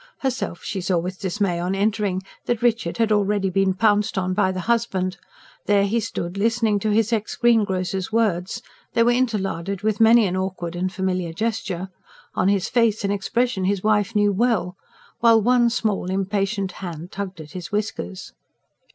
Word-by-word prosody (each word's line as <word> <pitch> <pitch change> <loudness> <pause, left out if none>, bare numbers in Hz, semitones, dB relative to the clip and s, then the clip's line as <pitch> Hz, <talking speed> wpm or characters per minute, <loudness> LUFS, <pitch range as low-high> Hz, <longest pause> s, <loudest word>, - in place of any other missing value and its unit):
Herself 260 -9 -2
she 190 - -3
saw 180 0 +1
with 180 +2 -3
dismay, 190 -2 -1
on 180 +2 -1
entering, 200 -2 0 0.2
that 240 -1 -1
Richard 225 -8 +1
had 225 -2 +1
already 205 -2 +1
been 195 0 +2
pounced 210 0 +2
on 185 0 0
by 190 -1 +2
the 185 0 -4
husband: 190 -4 0 0.5
there 200 -1 +4
he 220 +4 +1
stood, 185 -3 -4
listening 225 -1 +2
to 215 - -1
his 220 +2 +2
ex 215 -1 -1
greengrocer's 195 -5 +1
words 215 -1 0 0.3
they 230 - +4
were 240 - +4
interlarded 200 -6 -1
with 215 0 0
many 225 0 +7
an 185 -1 -1
awkward 185 -2 -3
and 185 +1 -1
familiar 185 -3 -2
gesture 200 -3 -3 0.4
on - - +1
his 195 -2 +2
face 230 -3 +2
an 200 - 0
expression 205 0 0
his 195 -1 0
wife 215 0 +1
knew 205 0 +4
well, 200 -4 +1 0.4
while 230 -1 +6
one 240 +2 +3
small, 215 -6 -1
impatient 195 +1 -1
hand 175 -1 -6
tugged 195 -3 -5
at 150 -1 -10
his 180 +4 -7
whiskers. 205 - -4
200 Hz, 170 wpm, -23 LUFS, 185-225 Hz, 0.5 s, many